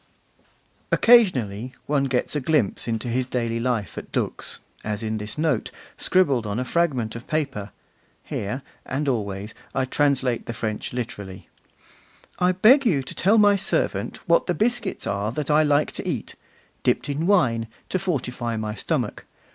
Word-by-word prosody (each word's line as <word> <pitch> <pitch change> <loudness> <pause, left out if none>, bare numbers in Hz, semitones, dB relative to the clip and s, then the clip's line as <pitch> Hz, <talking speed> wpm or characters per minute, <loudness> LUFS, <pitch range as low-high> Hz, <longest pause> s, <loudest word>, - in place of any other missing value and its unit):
Occasionally, 130 - +4
one 140 -1 +1
gets 130 +2 -1
a 150 - 0
glimpse 130 -8 +1
into 115 +1 -2
his 125 +2 +1
daily 115 -2 -1
life 115 -6 -1
at - - -12
Dux, - - -2 0.2
as 105 +1 -3
in 110 0 -2
this 105 +4 -3
note, 155 0 0 0.3
scribbled 140 -12 +2
on 100 +1 -2
a 125 - -1
fragment 130 -9 0
of 115 - -8
paper 140 -10 -2 0.5
(here 125 +7 -4 0.2
and 145 +3 -3
always 105 -4 -2 0.2
I 135 -1 +1
translate 135 -3 +1
the 115 - -3
French 110 -2 -3
literally): 100 -7 -6 0.9
'I 180 0 +4
beg 235 +10 +6
you 160 - +2
to 130 - -5
tell 205 +5 +3
my 205 -1 +6
servant 195 - 0
what - - +3
the - - +1
biscuits 230 -2 0
are 100 +2 -1
that 150 +1 -2
I 150 +1 +5
like 145 0 +2
to - - -4
eat; - - -3 0.5
dipped - - +1
in 145 +4 -1
wine, 120 - +3 0.2
to 185 - 0
fortify 125 -10 -2
my 110 -1 -3
stomach. 105 - -2
130 Hz, 160 wpm, -24 LUFS, 110-155 Hz, 0.9 s, beg